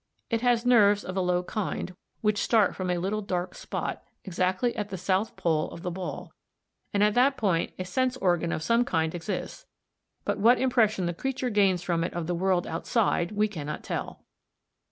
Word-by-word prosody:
It 230 Hz, -1 st, +1 dB
has 245 Hz, -1 st, +2 dB
nerves 210 Hz, -4 st, +5 dB
of 185 Hz, -, -6 dB
a 190 Hz, -, +1 dB
low 180 Hz, 0 st, +1 dB
kind 185 Hz, -2 st, -4 dB, 0.3 s
which 210 Hz, -1 st, +1 dB
start 220 Hz, -5 st, +3 dB
from 185 Hz, -1 st, -3 dB
a 180 Hz, -, +1 dB
little 195 Hz, +5 st, -1 dB
dark 180 Hz, -2 st, -3 dB
spot -, -, -4 dB
(ng), -, -, -37 dB
exactly 185 Hz, +5 st, 0 dB
at 210 Hz, -2 st, -3 dB
the 190 Hz, -, -5 dB
south 190 Hz, +4 st, 0 dB
pole 160 Hz, -2 st, 0 dB
of 170 Hz, -, -10 dB
the 180 Hz, -, -2 dB
ball, 185 Hz, +1 st, -6 dB, 0.6 s
and 205 Hz, 0 st, +2 dB
at 210 Hz, 0 st, +4 dB
that 265 Hz, +4 st, +3 dB
point 180 Hz, -6 st, 0 dB
a 185 Hz, -, -4 dB
sense 255 Hz, +7 st, 0 dB
organ 175 Hz, -5 st, +1 dB
of 160 Hz, -, -2 dB
some 230 Hz, +6 st, +3 dB
kind 160 Hz, -7 st, 0 dB
exists, 210 Hz, -, -5 dB, 0.6 s
but -, -, -1 dB
what 235 Hz, +5 st, +6 dB
impression 225 Hz, -7 st, +2 dB
the 175 Hz, -, -1 dB
creature 255 Hz, +5 st, -2 dB
gains 195 Hz, -4 st, +3 dB
from 170 Hz, -2 st, 0 dB
it 170 Hz, -, -4 dB
of 175 Hz, -2 st, -2 dB
the 175 Hz, -, -1 dB
world 180 Hz, 0 st, +1 dB
outside 175 Hz, +1 st, 0 dB
we 210 Hz, +1 st, +2 dB
cannot 150 Hz, -7 st, -6 dB
tell. -, -, -5 dB
190 Hz, 195 wpm, -27 LUFS, 175-225 Hz, 0.6 s, what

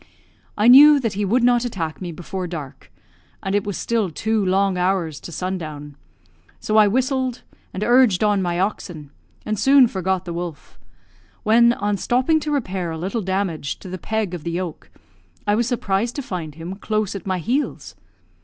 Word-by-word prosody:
I 210 Hz, +2 st, +3 dB
knew 285 Hz, +4 st, +9 dB
that 230 Hz, -5 st, -2 dB
he 205 Hz, +1 st, -2 dB
would 235 Hz, +5 st, +2 dB
not 245 Hz, 0 st, +4 dB
attack 175 Hz, -10 st, -4 dB
me 175 Hz, -2 st, -4 dB
before 180 Hz, +2 st, -5 dB
dark, 145 Hz, -, -8 dB, 0.5 s
and 195 Hz, -, -2 dB
it 205 Hz, -1 st, +1 dB
was 205 Hz, -5 st, -4 dB
still 225 Hz, -5 st, 0 dB
two 220 Hz, +5 st, -1 dB
long 190 Hz, 0 st, +2 dB
hours 180 Hz, -4 st, -1 dB
to -, -, -10 dB
sundown; 155 Hz, -5 st, -5 dB, 0.6 s
so 215 Hz, -, -2 dB
I 215 Hz, -1 st, +7 dB
whistled, 260 Hz, +2 st, -1 dB, 0.3 s
and 190 Hz, -, -4 dB
urged 240 Hz, -6 st, +4 dB
on 205 Hz, -2 st, +2 dB
my 175 Hz, -1 st, -1 dB
oxen, 175 Hz, -7 st, -3 dB, 0.3 s
and 215 Hz, -1 st, -2 dB
soon 275 Hz, -1 st, +6 dB
forgot 190 Hz, -4 st, -2 dB
the 170 Hz, -, -5 dB
wolf 170 Hz, -, -7 dB, 0.6 s
when, 235 Hz, +2 st, +5 dB
on 205 Hz, -2 st, -1 dB
stopping 255 Hz, +9 st, +2 dB
to 305 Hz, -1 st, -4 dB
repair 190 Hz, -, -2 dB
a 160 Hz, -, -4 dB
little 195 Hz, +7 st, -3 dB
damage 185 Hz, -6 st, -2 dB
to 185 Hz, -, -11 dB
the 185 Hz, 0 st, -6 dB
peg 220 Hz, -3 st, -2 dB
of 175 Hz, -4 st, -6 dB
the 170 Hz, -, -3 dB
yoke, 175 Hz, -2 st, -5 dB, 0.6 s
I 205 Hz, -, +2 dB
was 230 Hz, +2 st, +1 dB
surprised 230 Hz, -2 st, -1 dB
to 280 Hz, -, -4 dB
find 165 Hz, -9 st, -6 dB
him 170 Hz, +4 st, -7 dB
close 215 Hz, -1 st, -2 dB
at 200 Hz, -2 st, -7 dB
my 185 Hz, -1 st, 0 dB
heels. 250 Hz, -, -2 dB
195 Hz, 180 wpm, -21 LUFS, 175-230 Hz, 0.6 s, knew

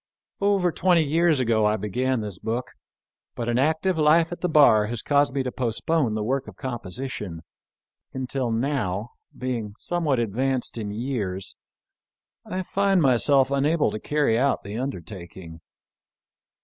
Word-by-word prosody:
Over 200 Hz, -3 st, +2 dB
twenty 175 Hz, -1 st, +3 dB
years 160 Hz, 0 st, +2 dB
ago 110 Hz, -4 st, +2 dB
I 105 Hz, +1 st, +1 dB
began 125 Hz, +5 st, -1 dB
this 105 Hz, -4 st, -5 dB
book; 120 Hz, +3 st, -3 dB, 0.6 s
but 120 Hz, -, -4 dB
an 120 Hz, +1 st, +1 dB
active 160 Hz, +5 st, +1 dB
life 160 Hz, +2 st, +4 dB
at 175 Hz, -, -6 dB
the 180 Hz, -, 0 dB
bar 140 Hz, -9 st, +5 dB
has 115 Hz, 0 st, -4 dB
caused 145 Hz, -3 st, +3 dB
me 135 Hz, 0 st, -1 dB
to 125 Hz, -, -3 dB
postpone 120 Hz, -3 st, -2 dB
xii 160 Hz, +6 st, 0 dB
PREFACE. 110 Hz, -2 st, -2 dB
the 110 Hz, -, -1 dB
work 130 Hz, +4 st, -1 dB
of -, -, -10 dB
composition, 120 Hz, -, -5 dB, 0.7 s
until, 130 Hz, -1 st, -2 dB
now, 115 Hz, -4 st, -1 dB, 0.3 s
being 115 Hz, -5 st, -3 dB
some 175 Hz, -1 st, -3 dB
what 140 Hz, -4 st, +2 dB
advanced 120 Hz, +3 st, -1 dB
in 105 Hz, -2 st, -4 dB
years, 105 Hz, -5 st, -3 dB, 0.9 s
I 185 Hz, 0 st, -4 dB
find 195 Hz, +1 st, +2 dB
myself 135 Hz, -1 st, +4 dB
unable 145 Hz, -1 st, +2 dB
to 110 Hz, -, -4 dB
carry 145 Hz, -3 st, +1 dB
out 140 Hz, +2 st, +1 dB
the 100 Hz, +2 st, -7 dB
undertaking. 85 Hz, -, -7 dB
130 Hz, 155 wpm, -24 LUFS, 110-150 Hz, 0.9 s, bar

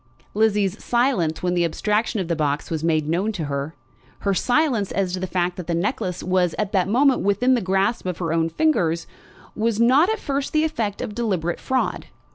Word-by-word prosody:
Lizzie's 210 Hz, -2 st, +1 dB
silence 235 Hz, -, +1 dB
when 180 Hz, 0 st, +1 dB
the 175 Hz, -1 st, +2 dB
abstraction 210 Hz, +6 st, 0 dB
of 185 Hz, -, -2 dB
the 170 Hz, -, 0 dB
box 150 Hz, -1 st, -1 dB
was 160 Hz, -1 st, -2 dB
made 155 Hz, -2 st, +1 dB
known 180 Hz, +7 st, 0 dB
to 175 Hz, -6 st, -4 dB
her, 140 Hz, +2 st, -4 dB, 0.5 s
her 200 Hz, -, +1 dB
silence 245 Hz, -, +1 dB
as 190 Hz, -2 st, -1 dB
to 185 Hz, -, -2 dB
the 185 Hz, -, -3 dB
fact 180 Hz, -1 st, -1 dB
that 180 Hz, -, -6 dB
the 170 Hz, -, 0 dB
necklace 190 Hz, 0 st, -2 dB
was 180 Hz, -2 st, +1 dB
at 210 Hz, -2 st, -1 dB
that 190 Hz, -3 st, +1 dB
moment 260 Hz, +5 st, +3 dB
within 205 Hz, +6 st, +2 dB
the 245 Hz, -, +2 dB
grasp 190 Hz, +3 st, 0 dB
of 180 Hz, -2 st, -3 dB
her 165 Hz, -3 st, -2 dB
own 165 Hz, 0 st, +1 dB
fingers, 170 Hz, -, +1 dB, 0.5 s
was 225 Hz, 0 st, 0 dB
not 265 Hz, -, +5 dB
at 440 Hz, -, 0 dB
first 280 Hz, -7 st, -3 dB
the 310 Hz, 0 st, +3 dB
effect 225 Hz, -10 st, -2 dB
of 230 Hz, -4 st, -5 dB
deliberate 190 Hz, -7 st, -1 dB
fraud. 260 Hz, -1 st, -1 dB
195 Hz, 205 wpm, -22 LUFS, 170-235 Hz, 0.5 s, not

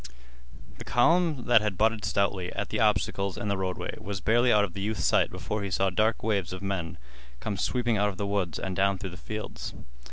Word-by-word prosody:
The -, -, -6 dB
column 155 Hz, +1 st, +2 dB
that 120 Hz, -3 st, +6 dB
had 105 Hz, -3 st, -2 dB
butted 110 Hz, -2 st, +2 dB
stoutly 100 Hz, -2 st, 0 dB
at -, -, -3 dB
the -, -, -2 dB
obstacles 100 Hz, -1 st, +1 dB
in 105 Hz, -, -3 dB
the 100 Hz, -, +1 dB
roadway 95 Hz, -1 st, -3 dB
was 100 Hz, -1 st, -5 dB
barely 120 Hz, +5 st, +3 dB
out 105 Hz, -1 st, +5 dB
of 95 Hz, -4 st, -3 dB
the 100 Hz, -, -5 dB
youth's 105 Hz, +1 st, -1 dB
sight -, -, +3 dB
before 105 Hz, 0 st, -4 dB
he 100 Hz, -, -3 dB
saw 95 Hz, +1 st, +1 dB
dark 110 Hz, +4 st, +1 dB
waves 100 Hz, -5 st, 0 dB
of 95 Hz, +1 st, -7 dB
men 95 Hz, -4 st, -3 dB, 0.4 s
come 105 Hz, -, -3 dB
sweeping 120 Hz, +3 st, 0 dB
out 105 Hz, +1 st, +2 dB
of 95 Hz, -, -7 dB
the 100 Hz, -, -2 dB
woods 100 Hz, -6 st, -1 dB
and 95 Hz, -1 st, -4 dB
down 100 Hz, +1 st, +2 dB
through 95 Hz, -1 st, -6 dB
the -, -, -9 dB
fields. 110 Hz, +2 st, -6 dB
100 Hz, 220 wpm, -28 LUFS, 95-110 Hz, 0.4 s, that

